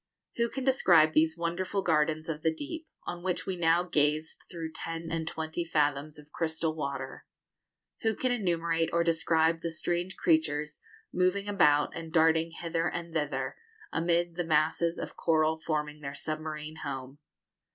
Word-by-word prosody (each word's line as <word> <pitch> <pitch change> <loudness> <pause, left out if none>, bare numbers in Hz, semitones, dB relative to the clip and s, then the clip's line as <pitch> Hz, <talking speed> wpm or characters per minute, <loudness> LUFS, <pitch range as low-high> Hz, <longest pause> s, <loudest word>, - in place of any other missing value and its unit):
Who 235 0 +2
can 270 - -4
describe 175 - +5
these 160 +1 +3
wonderful 185 +4 -1
gardens 155 -1 +1
of 155 -2 -3
the 160 - +2
deep, 315 - -6 0.2
on 175 - -5
which 180 0 -2
we 190 - -2
now 170 0 +3
gazed 155 -2 0
through 165 -3 -5
ten 165 +1 -5
and 165 -1 -2
twenty 160 +1 -3
fathoms 150 -2 0
of 150 0 -15
crystal 160 0 -1
water? 140 -3 -5 0.7
Who 225 -2 +1
can 255 +3 0
enumerate 170 -7 +1
or 170 0 +3
describe 165 0 +2
the 165 - -3
strange 175 +3 -2
creatures 150 -2 +1 0.3
moving 185 +3 +1
about 150 -8 +3
and 165 -1 -6
darting 160 0 +4
hither 165 0 -2
and 170 -1 -5
thither, 150 -4 -2 0.4
amid 170 0 +1
the 175 +1 -2
masses 160 +1 +2
of - - -6
coral 160 -1 +2
forming 150 -1 -2
their 140 -1 -5
submarine 155 0 -5
home? 135 -1 -6
165 Hz, 155 wpm, -30 LUFS, 155-175 Hz, 0.7 s, describe